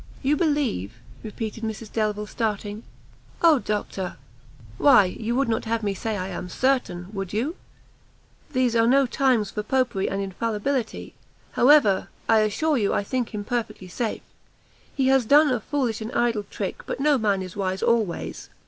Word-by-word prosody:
"You 280 Hz, +3 st, +3 dB
believe!" 290 Hz, -, 0 dB, 0.3 s
repeated 220 Hz, +1 st, -6 dB
Mrs 220 Hz, 0 st, -5 dB
Delvile, 210 Hz, -1 st, -1 dB
starting; 210 Hz, -1 st, -3 dB, 0.6 s
"Oh 320 Hz, -5 st, +6 dB
doctor!" 205 Hz, -4 st, -3 dB, 0.6 s
"Why 255 Hz, -8 st, +7 dB
you 225 Hz, +6 st, -3 dB
would 275 Hz, 0 st, +1 dB
not 225 Hz, 0 st, -1 dB
have 225 Hz, 0 st, -1 dB
me 200 Hz, -1 st, 0 dB
say 215 Hz, +2 st, -3 dB
I 185 Hz, 0 st, -4 dB
am 180 Hz, -1 st, -6 dB
certain, 195 Hz, -7 st, 0 dB
would 195 Hz, -2 st, -5 dB
you? 260 Hz, -, -1 dB, 1.0 s
these 255 Hz, -4 st, +1 dB
are 230 Hz, 0 st, +4 dB
no 270 Hz, +2 st, +5 dB
times 245 Hz, -5 st, +1 dB
for 210 Hz, -, -3 dB
Popery 240 Hz, -3 st, 0 dB
and 195 Hz, -, -2 dB
infallibility; 220 Hz, +5 st, -2 dB, 0.4 s
however, 250 Hz, -8 st, +4 dB, 0.2 s
I 225 Hz, -1 st, +5 dB
assure 260 Hz, +8 st, +1 dB
you 205 Hz, -, +1 dB
I -, -, 0 dB
think 250 Hz, +2 st, -2 dB
him 210 Hz, -1 st, -4 dB
perfectly 225 Hz, -4 st, -4 dB
safe. 225 Hz, +4 st, -3 dB, 0.7 s
He 265 Hz, -2 st, +2 dB
has 265 Hz, -1 st, +4 dB
done 290 Hz, +5 st, +5 dB
a 245 Hz, -, +1 dB
foolish 245 Hz, -2 st, -2 dB
and 220 Hz, +2 st, -5 dB
idle 230 Hz, -4 st, +1 dB
trick, 195 Hz, -, -4 dB
but -, -, -4 dB
no 290 Hz, -1 st, +3 dB
man 200 Hz, -3 st, +1 dB
is 185 Hz, -1 st, -9 dB
wise 190 Hz, -1 st, -2 dB
always. 220 Hz, -7 st, -1 dB
225 Hz, 165 wpm, -24 LUFS, 205-260 Hz, 1.0 s, Why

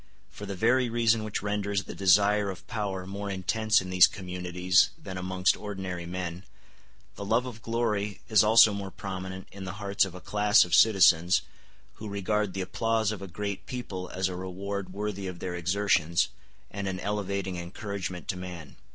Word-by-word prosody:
For 105 Hz, -, -9 dB
the 100 Hz, -, -4 dB
very 120 Hz, +5 st, +2 dB
reason 115 Hz, -1 st, +2 dB
which 105 Hz, -2 st, -4 dB
renders 100 Hz, -1 st, -1 dB
the -, -, -8 dB
desire 100 Hz, +2 st, +4 dB
of 90 Hz, -1 st, -8 dB
power 100 Hz, -5 st, -3 dB
more 100 Hz, +1 st, -5 dB
intense 105 Hz, +3 st, +1 dB
in 95 Hz, 0 st, -7 dB
these 90 Hz, -1 st, +8 dB
communities 90 Hz, -1 st, +1 dB
than 95 Hz, -2 st, -8 dB
amongst 95 Hz, +1 st, +1 dB
ordinary 95 Hz, -4 st, -5 dB
men, 90 Hz, 0 st, -5 dB, 0.7 s
the -, -, -5 dB
love 115 Hz, +5 st, +1 dB
of 115 Hz, -3 st, -8 dB
glory 110 Hz, -3 st, -1 dB
is 110 Hz, -3 st, +5 dB
also 110 Hz, 0 st, +7 dB
more 100 Hz, -1 st, -4 dB
prominent 95 Hz, -1 st, -6 dB
in 95 Hz, 0 st, -8 dB
the 90 Hz, -, -5 dB
hearts 100 Hz, -1 st, +1 dB
of 95 Hz, -2 st, -4 dB
a -, -, -7 dB
class 105 Hz, +2 st, +4 dB
of 90 Hz, -, -7 dB
citizens, 90 Hz, -5 st, +5 dB, 0.5 s
who 105 Hz, -1 st, -7 dB
regard 100 Hz, 0 st, -1 dB
the 95 Hz, -, -2 dB
applause 110 Hz, +3 st, 0 dB
of 105 Hz, -, -6 dB
a 95 Hz, -, -6 dB
great 100 Hz, +2 st, -5 dB
people 95 Hz, -8 st, -5 dB
as 95 Hz, 0 st, -1 dB
a 90 Hz, -, -5 dB
reward 95 Hz, +1 st, -5 dB
worthy 100 Hz, -1 st, -4 dB
of 90 Hz, -1 st, -6 dB
their 90 Hz, +1 st, -5 dB
exertions, 85 Hz, -2 st, +1 dB, 0.4 s
and 100 Hz, -1 st, -4 dB
an 95 Hz, -1 st, -3 dB
elevating 100 Hz, -2 st, -2 dB
encouragement 90 Hz, +1 st, -5 dB
to 95 Hz, -, 0 dB
man. 90 Hz, -5 st, -8 dB
100 Hz, 175 wpm, -28 LUFS, 90-105 Hz, 0.7 s, these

